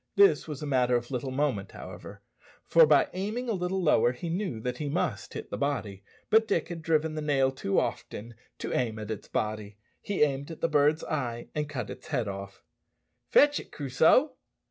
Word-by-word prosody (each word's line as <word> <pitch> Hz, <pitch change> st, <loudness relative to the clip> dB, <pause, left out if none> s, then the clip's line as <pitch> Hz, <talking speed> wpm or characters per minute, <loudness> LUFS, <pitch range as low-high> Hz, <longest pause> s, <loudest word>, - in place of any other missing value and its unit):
This 400 Hz, -, +5 dB
was 150 Hz, -1 st, -6 dB
a -, -, -2 dB
matter 125 Hz, -3 st, +2 dB
of 120 Hz, +1 st, -2 dB
little 130 Hz, +1 st, -2 dB
moment, 130 Hz, -7 st, -1 dB
however, -, -, -10 dB, 0.4 s
for 165 Hz, -2 st, +6 dB
by 150 Hz, -2 st, +4 dB
aiming 210 Hz, +7 st, -3 dB
a -, -, 0 dB
little 185 Hz, 0 st, -1 dB
lower 125 Hz, -6 st, +4 dB
he 165 Hz, +7 st, -6 dB
knew 175 Hz, -, -2 dB
that 125 Hz, +1 st, -3 dB
he 150 Hz, -2 st, -2 dB
must -, -, -2 dB
hit -, -, -7 dB
the -, -, -4 dB
body. 110 Hz, -9 st, -2 dB, 0.3 s
But 220 Hz, 0 st, +5 dB
Dick 205 Hz, -, 0 dB
had 170 Hz, -2 st, -6 dB
driven 160 Hz, 0 st, +1 dB
the 155 Hz, -, -3 dB
nail 135 Hz, -3 st, +2 dB
too 115 Hz, -7 st, 0 dB
often 115 Hz, +3 st, -4 dB, 0.2 s
to -, -, -4 dB
aim 115 Hz, -3 st, 0 dB
at 110 Hz, 0 st, -5 dB
its 105 Hz, -, -6 dB
body; 105 Hz, -1 st, -3 dB, 0.2 s
he 200 Hz, -6 st, +1 dB
aimed 140 Hz, 0 st, -1 dB
at 165 Hz, -, -9 dB
the -, -, +3 dB
bird's 150 Hz, 0 st, +3 dB
eye, 120 Hz, -6 st, -3 dB
and 150 Hz, -1 st, -2 dB
cut 125 Hz, -7 st, -4 dB
its -, -, -10 dB
head 115 Hz, -, -1 dB
off. 100 Hz, 0 st, -7 dB, 0.7 s
"Fetch 290 Hz, 0 st, +5 dB
it, -, -, -11 dB
Crusoe." 155 Hz, -, +3 dB
145 Hz, 200 wpm, -28 LUFS, 120-165 Hz, 0.7 s, for